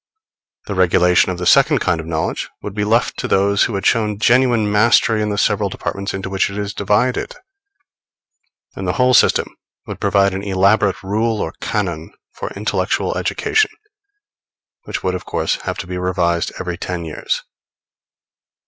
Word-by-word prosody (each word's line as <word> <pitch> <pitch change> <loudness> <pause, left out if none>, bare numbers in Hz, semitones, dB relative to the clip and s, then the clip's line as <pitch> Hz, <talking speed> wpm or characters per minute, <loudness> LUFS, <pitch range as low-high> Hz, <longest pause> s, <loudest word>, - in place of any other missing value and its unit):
The 100 - -4
regulation 90 -1 +3
of 90 - -4
the 90 - -4
second - - +5
kind 85 - 0
of 80 - -7
knowledge 80 -1 -2
would 105 - -5
be 105 0 -2
left 115 +3 +1
to - - -2
those 100 +1 +2
who 115 - -3
had 95 - -3
shown 105 -2 +1
genuine 120 -2 +3
mastery 110 +1 +3
in 105 - -1
the 105 - -2
several - - +1
departments 100 0 -4
into 95 0 -5
which 95 0 0
it 100 - -7
is 105 0 -3
divided; 105 +5 0 1.4
and - - -5
the - - 0
whole 125 -1 +3
system - - +3 0.3
would - - -7
provide 100 -1 +2
an 95 - -3
elaborate 100 0 +2
rule 110 +3 -1
or 80 - -3
canon 85 -6 -3 0.2
for - - -6
intellectual - - -1
education, 435 -1 +1 1.2
which - - -5
would, 95 - 0
of 90 - -5
course, - - -1
have - - -2
to - - -5
be 90 0 -5
revised 90 -2 0
every 90 -2 -4
ten 90 -3 -4
years. 80 - -3
100 Hz, 165 wpm, -18 LUFS, 90-105 Hz, 1.4 s, second